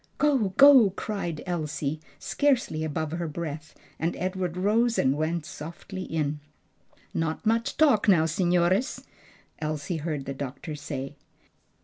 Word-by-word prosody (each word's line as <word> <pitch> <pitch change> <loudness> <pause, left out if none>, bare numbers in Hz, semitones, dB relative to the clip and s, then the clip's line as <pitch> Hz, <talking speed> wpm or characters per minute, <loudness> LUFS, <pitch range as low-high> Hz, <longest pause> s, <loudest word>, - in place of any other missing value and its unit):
"Go! 270 -9 +2
go!" 275 -6 +9
cried 185 -5 -4
Elsie, 155 -4 -2 0.2
scarcely 255 - 0
above 155 0 -2
her 170 0 -3
breath, 155 -1 -6 0.2
and 165 +2 -1
Edward 185 -1 -2
rose 225 +5 +2
and 130 +1 +3
went 155 +1 -1
softly 170 +5 -8
in. 150 -4 -2 0.7
"Not 160 +5 -2
much 230 +1 +1
talk 280 -10 +4
now, 170 -6 +5
signores," 180 - +1 0.5
Elsie 155 +2 -3
heard 150 -3 -3
the 140 - -4
doctor 140 +3 -6
say. 145 -1 -6
165 Hz, 125 wpm, -27 LUFS, 150-200 Hz, 0.7 s, go